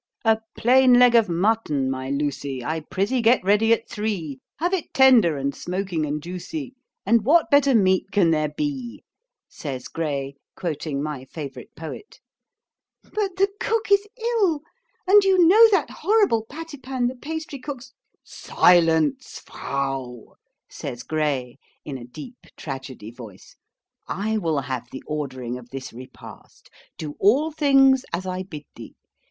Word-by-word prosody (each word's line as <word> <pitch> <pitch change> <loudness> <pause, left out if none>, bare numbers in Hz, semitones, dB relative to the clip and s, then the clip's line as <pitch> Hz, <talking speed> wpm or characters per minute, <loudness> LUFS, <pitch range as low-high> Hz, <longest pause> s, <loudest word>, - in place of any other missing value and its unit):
'"A 220 0 +4 0.2
plain 255 +1 +5
leg 245 -1 +6
of 230 -5 +4
mutton, 170 -6 0
my 130 0 -3
Lucy, 140 -2 -3
I 160 +3 -2
prythee 200 - -1
get 230 0 +4
ready 210 +4 +3
at 230 0 +2
three; 190 -11 -4 0.2
Have 350 +5 -1
it 365 -5 -3
tender, 240 - +6
and 140 0 -2
smoking, 180 -3 -3
and 150 +1 -3
juicy, 250 - -6 0.3
And 230 +2 +3
what 320 +7 +3
better 285 -2 +5
meat 190 -3 +3
can 180 -5 +3
there 155 -1 +1
be?"' 260 - -4 0.4
says 130 -4 -7
Gray, 140 -4 -4 0.2
quoting 155 -4 -3
my 150 -4 -5
favourite 135 -3 -9
poet. 165 - -9 0.8
'But 400 -4 -3
the 390 +1 +3
cook 450 -2 -1
is 400 +1 +4 0.3
ill; 335 -8 +2 0.4
and 405 +2 +6
you 375 -3 +4
know 440 +6 +8
that 390 - +1
horrible 400 - +1
Pattypan 270 -5 -4
the 250 - -3
pastrycook's 280 -2 -7 0.2
' - - -66
'Silence, 170 - +2
Frau!' 135 -3 -5 0.3
says 120 - -7
Gray, 145 -5 -2 0.3
in 135 -3 -6
a 120 - -10
deep 155 - -10 0.2
tragedy 130 -6 -7
voice. 115 -6 -13 0.5
'I 215 +3 -1
will 160 -6 0
have 130 -2 -5
the 130 - -9
ordering 130 -5 -4
of 120 -1 -15
this 135 -1 -8
repast. 125 +2 -13 0.3
Do 150 -2 -6
all 275 +11 +3
things 270 -3 +4
as 175 +3 -3
I 185 0 -3
bid 155 -6 -9
thee. - - -11
185 Hz, 145 wpm, -23 LUFS, -, 0.8 s, know